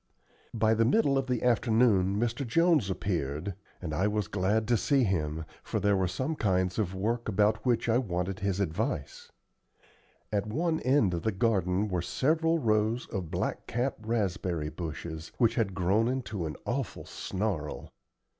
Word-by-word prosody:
By 110 0 +3
the 115 +1 +3
middle 140 - +3
of 135 -1 0
the 125 -3 -1
afternoon 110 -5 +3
Mr. 120 +4 -1
Jones 150 - +3
appeared, 90 -2 -2 0.3
and 80 -4 -5
I 95 +6 +1
was 105 -3 -1
glad 105 +3 0
to 120 - +5
see 135 +4 +2
him, 80 -6 -1 0.2
for - - -2
there 100 0 +3
were 95 -1 +1
some 130 - -2
kinds 95 -5 0
of 95 -3 -1
work 115 +4 -1
about 105 +2 +2
which 120 -1 +2
I 115 +1 +3
wanted 90 -4 -2
his 100 -1 -1
advice. 85 -5 -3 1.0
At 105 0 0
one 160 +8 0
end 130 -8 +3
of 85 - -2
the 110 - 0
garden 95 -1 +1
were 90 -3 -1
several 160 - +1
rows 110 -2 +1
of 95 -6 -4
blackcap 125 +10 -2
raspberry 95 -8 -1
bushes, 80 0 -6
which 115 -2 +3
had 105 -6 0
grown 100 +5 +2
into 110 -9 -2
an 75 - -5
awful 125 0 -3
snarl. 95 -7 -4
105 Hz, 160 wpm, -29 LUFS, 90-120 Hz, 1.0 s, to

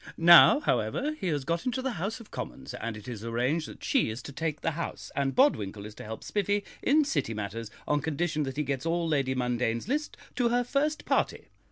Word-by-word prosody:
Now, 170 - +8
however, 295 0 0
he 190 - -2
has 145 -5 0
got 170 +6 -1
into 250 +1 0
the 265 - 0
House 205 +4 -3
of 230 - -14
Commons, - - -6
and 115 -2 -4
it 105 - -12
is 115 -4 -6
arranged 125 +8 0
that - - -12
she 270 - +2
is 110 +3 -6
to - - -8
take 150 +1 -3
the 165 - 0
house, 170 +2 -5
and 135 -1 0
Bodwinkle 105 - +2
is 105 - -8
to - - -10
help 110 +1 -7
Spiffy 205 0 0 0.2
in 300 +2 +4
City 195 - -1
matters, 105 +2 -5 0.2
on 145 0 +2
condition 155 +1 -1
that 135 -1 -3
he 150 - +1
gets 140 +2 -2
all 170 0 0
Lady 135 -4 +1
Mundane's 125 -1 -1
list 295 +4 -2 0.2
to 245 -2 +3
her 245 +1 +2
first 290 +5 -1
party. - - 0
155 Hz, 220 wpm, -29 LUFS, -, 0.2 s, Now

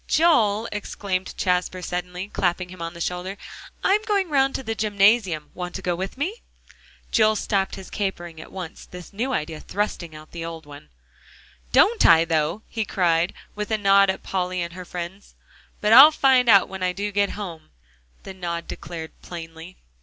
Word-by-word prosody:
"Joel," 230 -10 +3
exclaimed 195 -2 -4
Jasper 180 0 0
suddenly, 180 +2 -4
clapping 180 -3 -1
him 185 -1 -11
on 165 +1 -5
the 170 - -8
shoulder, 180 +3 -3 0.5
"I'm 405 +2 +3
going 400 -4 +1
round 270 -2 +2
to - - -4
the 225 - -2
gymnasium; 200 -6 +2
want 180 -1 -6
to 190 - -6
go 175 -1 0
with 190 +7 -5
me?" 370 - -3 0.7
Joel 215 -1 +4
stopped 195 -2 -1
his 190 -1 -11
capering 175 -5 -4
at - - -13
once, 185 -1 -8
this 180 +2 -11
new 240 +6 -2
idea 155 -8 -3
thrusting 175 -4 -3
out 155 0 -13
the 170 -1 -6
old 165 -1 -7
one. 145 - -13 0.8
"Don't 455 +3 +4
I, 165 0 +7
though!" 160 +5 0
he 225 - -2
cried, 175 -3 +1 0.2
with 210 0 -5
a 220 - +1
nod 195 -1 +5
at 190 - -2
Polly 185 -1 -2
and 170 0 -6
her 180 0 -8
friends. 180 +3 -8 0.5
"But 210 +1 +3
I'll 270 +5 +11
find 265 -5 +3
out 200 -3 +7
when 190 -1 -8
I 180 0 0
do 205 +2 -3
get 200 0 +1
home," 170 -7 -7 0.5
the 190 - -8
nod 170 -2 -4
declared 165 -2 -7
plainly. 165 +1 -9
190 Hz, 180 wpm, -23 LUFS, 170-210 Hz, 0.8 s, I'll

